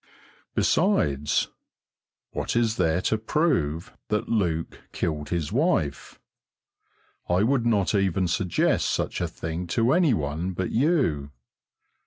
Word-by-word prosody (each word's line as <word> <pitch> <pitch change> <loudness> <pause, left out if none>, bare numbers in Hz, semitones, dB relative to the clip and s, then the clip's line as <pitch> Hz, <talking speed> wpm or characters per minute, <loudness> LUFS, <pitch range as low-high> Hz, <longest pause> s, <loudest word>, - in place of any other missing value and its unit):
Besides, 70 0 +2 0.8
what - - -3
is 115 -2 +1
there 90 0 +1
to 110 - +1
prove 90 - 0
that 105 0 -1
Luke 85 -7 -1
killed 75 -2 -2
his 85 -4 -2
wife? 120 - 0 1.1
I 90 +3 +3
would 120 0 +2
not 105 -4 +2
even 95 -2 +1
suggest 90 +1 +1
such - - -2
a - - 0
thing 80 +2 -5
to 115 +3 +4
any 165 -8 +4
one 80 +4 -3
but 90 +1 -3
you. 120 - +1
90 Hz, 120 wpm, -25 LUFS, 80-115 Hz, 1.1 s, to